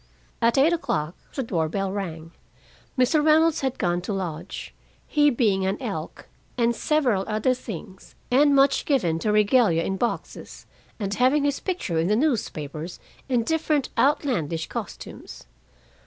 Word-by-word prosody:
At 230 +1 +3
eight 300 +6 +5
o'clock 160 - -2 0.2
the 270 - -1
door 165 -8 -1
bell 195 +2 -2
rang. 165 -5 -5 0.7
Mr. 255 +4 +3
Reynolds 315 +1 +4
had 265 -2 -1
gone 175 0 0
to 180 - -5
lodge, 175 -2 -5 0.3
he 295 -1 +3
being 215 -7 +1
an 190 +1 -1
Elk - - -6 0.3
and 235 -1 +2
several 250 -11 +1
other 215 +4 +1
things, 190 -6 -9 0.2
and 285 +3 +5
much 275 0 +3
given 180 - +1
to 210 - 0
regalia 210 -5 +3
in 195 +2 -2
boxes, 235 +3 -4 0.3
and 200 -2 -2
having 260 +6 +3
his 285 -1 0
picture 345 - -2
in 165 - +1
the 210 - +3
newspapers 175 - -2 0.3
in 245 -3 +2
different 305 -1 0
outlandish 230 - +1
costumes. - - -8
225 Hz, 145 wpm, -24 LUFS, 180-275 Hz, 0.7 s, eight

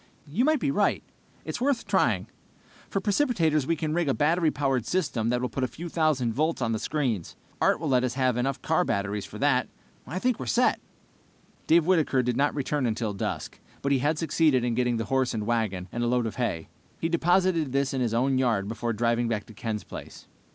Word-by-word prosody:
"You 175 - 0
might 310 -1 +3
be 280 - 0
right! - - +1 0.4
It's - - -4
worth 265 -2 +1
trying. - - +2 0.6
For 195 - 0
precipitators 190 - +1
we 165 - +2
can 155 -1 -2
rig 170 -3 +1
a 135 - +1
battery 160 +2 +2
powered 135 -5 -1
system 140 -11 0
that 125 0 0
will - - +1
put 135 - -3
a - - +2
few 170 +7 -8
thousand 150 -8 +1
volts 155 +6 0
on 115 -3 0
the 110 - -1
screens. 125 - -2 0.3
Art - - +3
will 160 -2 -2
let 130 -1 +3
us 125 -1 -1
have 130 -2 +2
enough 130 +2 -2
car 160 +3 +2
batteries 100 - -2
for 105 - -9
that. 130 0 +2 0.4
I 160 +8 -4
think 250 +4 0
we're 130 - -5
set!" 95 - +2 0.9
Dave 165 0 +5
Whitaker 160 -8 +2
did 125 0 0
not 145 +1 +1
return 140 -1 0
until 110 -1 -2
dusk, 100 - -4 0.2
but 140 - 0
he 135 - +3
had 150 +4 +1
succeeded 155 -5 +2
in 120 -1 0
getting 125 0 +1
the 115 - -2
horse 130 0 0
and 105 -1 -2
wagon, 105 -6 -1
and 120 - -2
a - - +1
load 120 0 +1
of 110 - -5
hay. 115 -10 -2 0.3
He 165 - 0
deposited 170 -2 +2
this 140 0 0
in 130 - -1
his 115 -2 0
own 130 +2 +2
yard 115 -6 +1
before 115 +2 -2
driving 120 +2 +1
back 110 -2 -2
to 110 - -13
Ken's 110 -1 -4
place. - - -10
130 Hz, 220 wpm, -27 LUFS, 115-160 Hz, 0.9 s, Dave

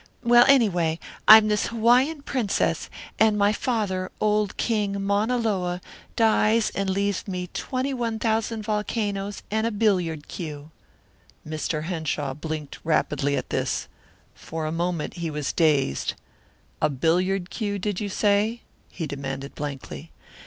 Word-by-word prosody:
Well, 240 0 +7
anyway, 180 -12 +3 0.3
I'm 215 0 +10
this 210 -1 +1
Hawaiian 250 +6 +3
princess, 245 -8 -1 0.3
and 220 -1 +4
my 205 +1 +3
father, 205 -6 -1
old 210 -1 +1
King 205 -3 0
Mauna 205 +5 +1
Loa, 185 -6 -1 0.4
dies 220 0 +3
and 195 -1 -2
leaves 200 +1 -1
me 180 -2 -4
twenty 260 +1 -2
one 235 -3 -2
thousand 220 0 -1
volcanoes 210 -1 -2
and 220 +1 +1
a - - -1
billiard 185 -8 0
cue 150 -2 -7 0.4
" - - -24
Mr. 155 0 -2
Henshaw 155 -5 -2
blinked 155 0 -6
rapidly 145 -3 +1
at - - -5
this. - - -1 0.5
For 160 -1 -6
a 155 - -2
moment 170 -1 -2
he 170 -1 -3
was 150 -2 -3
dazed. 145 - +1 0.7
"A 150 - +3
billiard 175 +6 0
cue, 205 -3 -2
did 200 -1 -2
you 205 - -3
say?" 210 +4 +1 0.3
he 165 - -5
demanded 135 -1 -5
blankly. 145 +2 -7
200 Hz, 140 wpm, -25 LUFS, 160-220 Hz, 0.7 s, I'm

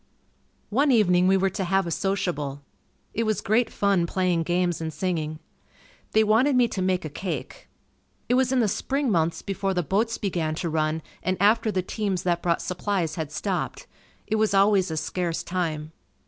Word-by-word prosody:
One 275 +6 +3
evening 180 -6 +4
we 190 +1 +5
were 190 0 +1
to 195 - -3
have 190 +1 +1
a 170 - -4
sociable. 150 -8 -2 0.5
It 230 - -1
was 215 -1 0
great 225 +3 +2
fun 195 -4 +1
playing 180 -2 +1
games 175 0 0
and 160 0 -3
singing. 155 -2 -2 0.8
They 220 - +5
wanted 230 +6 +3
me 245 -1 +4
to 195 - -3
make 185 -2 0
a - - -1
cake. 180 +6 -6 0.6
It - - +1
was 255 0 +3
in 260 -2 +3
the 220 - +2
spring 270 +5 -1
months 165 -2 0
before 195 -1 -2
the 180 - +1
boats 220 +7 0
began 170 -6 -1
to 170 0 -3
run 155 0 0 0.2
and 185 0 -1
after 215 +3 +3
the 185 -2 -1
teams 195 -2 -2
that 175 -1 0
brought 170 -1 0
supplies 180 -2 -1
had 155 -2 -4
stopped. 180 +4 -3 0.4
It 220 - 0
was 215 -2 +2
always 195 -2 +4
a 160 - -3
scarce 170 +1 -2
time. 160 -4 -3
185 Hz, 185 wpm, -25 LUFS, 170-210 Hz, 0.8 s, we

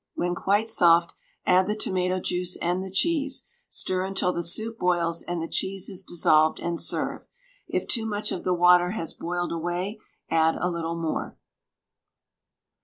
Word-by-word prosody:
When 175 0 -1
quite 205 +5 +1
soft, 170 -5 +4 0.3
add 185 +1 +4
the 210 - 0
tomato 185 -3 0
juice 180 0 -2
and 175 +2 0
the 190 - -6
cheese; 280 - +1 0.2
stir 185 0 -1
until 190 -1 -1
the 170 - -2
soup 220 +7 0
boils 170 -2 +1
and 175 -1 -4
the 165 - -3
cheese 190 +1 -1
is 190 - -2
dissolved, 160 -3 +3
and 170 -1 -2
serve. - - -2 0.4
If - - -2
too 225 -2 -1
much 210 -1 -2
of 180 - -4
the 185 - 0
water 180 0 +5
has 165 - -3
boiled 175 +1 -3
away, 175 +5 -3 0.3
add 160 0 +3
a 180 - 0
little 170 -1 -3
more. 165 -1 -3
180 Hz, 165 wpm, -26 LUFS, 170-190 Hz, 0.4 s, water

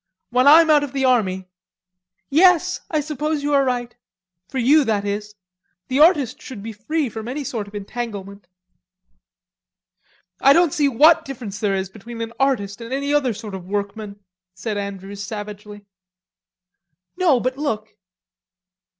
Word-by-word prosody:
When 250 +2 +3
I'm 320 +2 +8
out 295 -1 +5
of 280 -2 -6
the 270 -1 0
army!..." 190 -7 +1 0.8
"Yes, 360 +3 +4
I 310 -2 0
suppose 300 0 -3
you 290 0 0
are 280 -1 +4
right... 245 -2 -2 0.5
for - - -5
you 285 +5 +5
that 210 -4 -1
is. 210 +1 -4 0.5
The 260 +2 0
artist 300 -6 +4
should 225 -6 -9
be 225 0 -6
free 290 +8 -2
from 220 -1 -7
any 280 +4 -4
sort 225 -5 -4
of 205 - -13
entanglement." 200 -3 -6 1.9
"I 275 - +6
don't 340 -1 +3
see 290 -2 +2
what 310 +6 +5
difference 235 -8 -7
there 205 -2 0
is 190 0 -2
between 230 +3 -10
an 230 0 -5
artist 240 -6 0
and 230 +1 -8
any 280 +2 -1
other 265 -6 +1
sort 210 -1 -8
of 185 -2 -7
workman," 205 +1 -4 0.4
said 210 +3 -4
Andrews 200 0 -6
savagely. 205 0 -8 1.3
"No, 345 -8 +3
but 255 +3 -2
look." 220 -8 -3
235 Hz, 150 wpm, -21 LUFS, 205-285 Hz, 1.9 s, I'm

